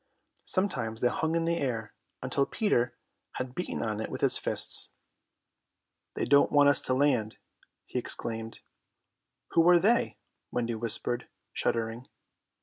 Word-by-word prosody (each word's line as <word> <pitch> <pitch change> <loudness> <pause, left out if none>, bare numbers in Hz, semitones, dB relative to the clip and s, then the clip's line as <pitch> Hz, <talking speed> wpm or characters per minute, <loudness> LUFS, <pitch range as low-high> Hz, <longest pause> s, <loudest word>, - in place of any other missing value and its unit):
Sometimes 120 - -1
they 125 - +3
hung 160 +5 -1
in 165 0 +1
the 170 0 +1
air 115 -5 -3 0.3
until 135 +2 0
Peter 125 - 0 0.4
had 130 -1 -5
beaten 180 - -4
on 110 -1 -2
it - - -4
with - - -6
his - - +7
fists. - - +2 1.3
"They - - -1
don't 140 +1 +4
want 145 -1 +6
us 140 - +4
to 130 - +3
land," 130 -6 +1 0.5
he - - -3
explained. 115 0 -4 0.9
"Who 165 +1 +4
are 175 - +7
they?" 220 +7 +2 0.3
Wendy 120 -1 -2
whispered, 115 +2 -3 0.2
shuddering. 115 +2 -2
125 Hz, 140 wpm, -29 LUFS, 115-160 Hz, 1.3 s, his